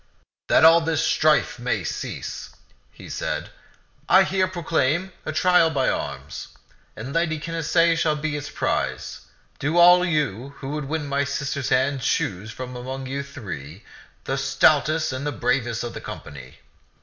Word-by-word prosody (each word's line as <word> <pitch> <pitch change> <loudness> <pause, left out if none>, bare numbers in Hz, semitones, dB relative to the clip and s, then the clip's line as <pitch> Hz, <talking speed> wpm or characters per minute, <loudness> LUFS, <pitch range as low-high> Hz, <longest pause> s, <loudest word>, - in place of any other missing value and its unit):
"That - - +5
all 165 +1 +8
this 160 -2 0
strife 150 -4 +2
may 125 +1 -1
cease," - - -5 0.4
he - - -13
said, - - -4 0.6
"I 190 +1 +7
here 190 0 +1
proclaim 170 -1 0 0.2
a - - 0
trial 180 -3 +4
by 140 -4 +1
arms, - - -4 0.5
and 130 +5 -7
Lady 165 -2 0
Canacee 165 +1 +1
shall 155 -2 +1
be 150 0 -3
its 145 0 -5
prize. - - -3 0.3
Do 155 +4 0
all 180 +1 +7
you 140 - -1
who 135 - -7
would 150 0 -3
win 150 +1 -3
my 140 0 0
sister's 140 -1 -3
hand 135 +1 +1
choose 100 -2 -1
from 125 +2 -7
among 130 +2 -6
you 135 +2 -3
three, 100 - -8 0.4
the - - -2
stoutest 155 -2 +2
and 130 +2 -4
the 145 - -1
bravest 120 0 -1
of 120 - -5
the - - -7
company. 65 -3 -9
145 Hz, 155 wpm, -23 LUFS, 130-165 Hz, 0.6 s, all